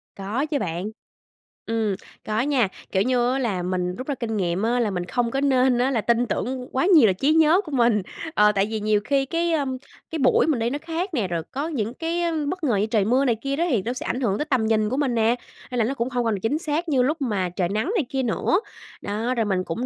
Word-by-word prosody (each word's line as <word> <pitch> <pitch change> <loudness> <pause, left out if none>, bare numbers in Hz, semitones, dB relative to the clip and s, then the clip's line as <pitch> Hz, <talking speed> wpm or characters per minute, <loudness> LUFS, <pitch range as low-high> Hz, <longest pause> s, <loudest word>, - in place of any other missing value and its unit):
Có 210 +9 -2
chứ 295 -2 -1
bạn. 180 +5 -3 0.8
Ừm, 220 -3 0 0.3
có 215 +2 0
nha, 260 -6 +2 0.2
kiểu 190 0 +2
như 245 -1 +2
á 270 - 0
là 200 -8 -1
mình 180 0 -1
rút 255 - -7
ra 285 - -1
kinh 225 -4 -3
nghiệm 180 +1 -1
á 240 +2 +1
là 220 -4 +1
mình 175 -1 -3
không 235 +4 -1
có 270 - -1
nên 260 -3 +3
á 255 +2 +2
là 230 - +1
tin 235 +2 +2
tưởng 250 +3 -3
quá 265 +6 +1
nhiều 320 - +7
là 190 - +3
trí 275 +11 +2
nhớ 320 +3 +5
của 315 -7 -10
mình. 235 -5 +3 0.3
Ờ, 210 0 +5
tại 200 0 +1
vì 220 - -1
nhiều 210 0 +1
khi 275 -1 +1
cái, 335 +3 0
ưm, 270 -4 -1 0.3
cái 325 - -3
buổi 260 +3 +4
mình 290 -7 +1
đi 230 - 0
nó 280 - -2
khác 335 +3 -3
nè, 220 -9 0
rồi 170 -2 -2
có 285 +4 -2
những 235 -8 -2
cái 335 +4 -2
á, 340 -1 0 0.2
bất 365 -2 -4
ngờ 245 -7 +2
như 200 +2 +2
trời 215 -3 +1
mưa 255 +5 +3
này 235 -4 +2
kia 275 0 -1
đó 335 - +1
thì 235 - +2
nó 240 - -2
sẽ 255 - -6
ảnh 250 +3 -2
hưởng 205 -6 +1
tới 300 - -2
tầm 260 -7 +1
nhìn 215 -1 +2
của 260 - -2
mình 275 -4 +1
nè, 230 +1 +3 0.4
nên 250 - -2
là 220 - +3
nó 265 - -1
cũng 255 -2 -2
hông 245 -2 -1
còn 215 -3 0
chính 225 +10 0
xác 320 +2 -2
như 270 -4 +3
lúc 300 +5 0
mà 205 -8 0
trời 175 0 -1
nắng 215 - -1
này 325 - +1
kia 265 -1 -1
nữa. 295 - +1 0.4
Đó, 225 +5 -2
rồi 225 -3 +1
mình 190 -2 0
cũng 185 +9 -3
245 Hz, 270 wpm, -24 LUFS, 210-280 Hz, 0.8 s, nhiều